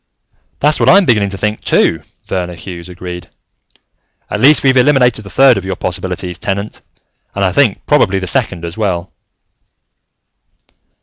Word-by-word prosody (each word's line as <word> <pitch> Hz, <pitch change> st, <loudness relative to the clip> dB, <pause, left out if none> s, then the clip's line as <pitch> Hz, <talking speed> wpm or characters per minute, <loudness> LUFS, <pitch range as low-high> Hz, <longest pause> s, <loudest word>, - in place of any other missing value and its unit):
"That's 150 Hz, +1 st, +2 dB
what -, -, +3 dB
I'm 195 Hz, +1 st, +6 dB
beginning 105 Hz, -7 st, +2 dB
to 95 Hz, -, -7 dB
think, 105 Hz, +2 st, -2 dB
too," -, -, +1 dB, 0.2 s
Verner 90 Hz, -2 st, -4 dB
Hughes 85 Hz, +1 st, -9 dB
agreed. 90 Hz, -1 st, -8 dB, 1.0 s
"At 105 Hz, -, -2 dB
least, 145 Hz, +7 st, +5 dB
we've 130 Hz, -1 st, +3 dB
eliminated 125 Hz, -4 st, +3 dB
the 100 Hz, -, -11 dB
third 130 Hz, -4 st, +4 dB
of -, -, -10 dB
your 95 Hz, 0 st, -4 dB
possibilities, 90 Hz, 0 st, -4 dB
Tenant. 100 Hz, +1 st, -4 dB, 0.5 s
And -, -, 0 dB
I -, -, +1 dB
think -, -, +1 dB
probably 95 Hz, +1 st, +2 dB
the 95 Hz, -, -3 dB
second, 95 Hz, -5 st, -1 dB
as 85 Hz, +1 st, -6 dB
well." 95 Hz, -5 st, -3 dB
100 Hz, 150 wpm, -14 LUFS, 90-125 Hz, 1.0 s, I'm